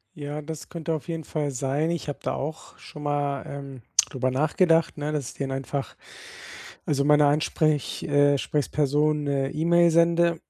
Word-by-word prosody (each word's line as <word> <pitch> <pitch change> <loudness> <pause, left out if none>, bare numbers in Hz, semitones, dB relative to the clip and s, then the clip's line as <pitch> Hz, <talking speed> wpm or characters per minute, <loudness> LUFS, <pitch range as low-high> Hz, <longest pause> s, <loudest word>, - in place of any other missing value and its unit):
Ja, 145 -1 -5
das 155 0 -7
könnte 165 -1 -4
auf 155 - -4
jeden 165 -1 -4
Fall 150 -1 -2
sein. 135 +4 -1
Ich 170 -3 -3
habe 145 - -5
da - - -2
auch 155 +3 -6
schon 150 -2 -11
mal, 145 -1 -1
ähm, 140 -3 -8 0.3
darüber 130 -1 -1
nachgedacht, 165 +5 +2
ne, 150 +1 -3
dass 145 -5 -2
ich - - -17
den 135 -1 -3
einfach 135 +1 -4 0.9
also, 140 -1 +1
meiner 150 0 +5
Ansprech 150 -1 +1
äh, 145 0 +3
Sprechsperson 150 +1 +1
'ne 140 -1 0
E-Mail 170 +2 +4
sende 170 0 +3
150 Hz, 165 wpm, -25 LUFS, 140-160 Hz, 0.9 s, meiner